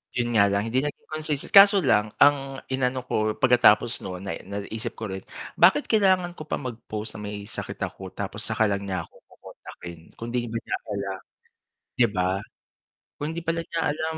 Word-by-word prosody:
'Yun 120 -1 +1
nga 100 -2 +6
lang 100 +1 +1
hindi 125 +3 +1
naging 145 +1 -4
consistent 155 -2 -3
kaso 200 +1 +9
lang 105 -5 +2
ang 135 -2 +3
inano 130 -1 0
ko 110 -3 0
pagkatapos 120 -3 +4
no'n 90 -1 -6
na 95 - -4 0.3
naisip 110 +2 -5
ko 110 -3 -5
rin, 95 0 -6 0.4
bakit 190 +12 +6
kailangan 190 -5 +3
ko 155 - -8
pa - - -1
mag 125 -4 -6
post 105 0 -5
na 105 - -6
may 105 0 -6
sakit 105 - -6
ako - - -5
tapos - - -5
'saka 110 - +2
lang 100 0 -2
niya 90 -3 -2
ako - - -19
kokontakin 85 -2 -11 0.2
kundi 120 +1 -3
ba 115 0 -3
niya - - -2
kaila 100 -1 -3 0.9
'di 120 - +6
ba? 90 -3 0 0.9
Kung 145 - -3
hindi 170 - -4
pala 165 0 -1
niya 165 -1 -3
alam 160 +2 -3
120 Hz, 185 wpm, -25 LUFS, 105-150 Hz, 0.9 s, kaso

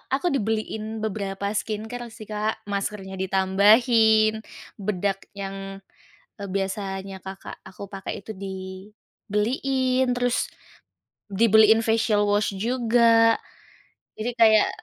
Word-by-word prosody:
aku 345 +6 -1
dibeliin 220 -2 -2
beberapa 200 -1 -3
skincare 220 +3 -4
sih, 220 -1 -11
Kak. 215 +1 -3
Maskernya 195 -1 -4
ditambahin, 215 +4 +4 0.4
bedak 195 -1 -2
yang, 195 0 -7 0.5
eee, 200 -1 -7
biasanya 195 -1 -4
kakak 190 0 -8
aku 190 +1 -10
pakai 195 0 -6
itu 210 +1 -9
dibeliin. 210 +7 -2
Terus 245 0 0 0.8
dibeliin 220 +2 +5
facial 225 -2 +2
wash 205 0 +1
juga. 230 0 +3 0.8
Jadi, 220 +3 -3
kayak 220 -2 +5
210 Hz, 95 wpm, -24 LUFS, 195-225 Hz, 0.8 s, dibeliin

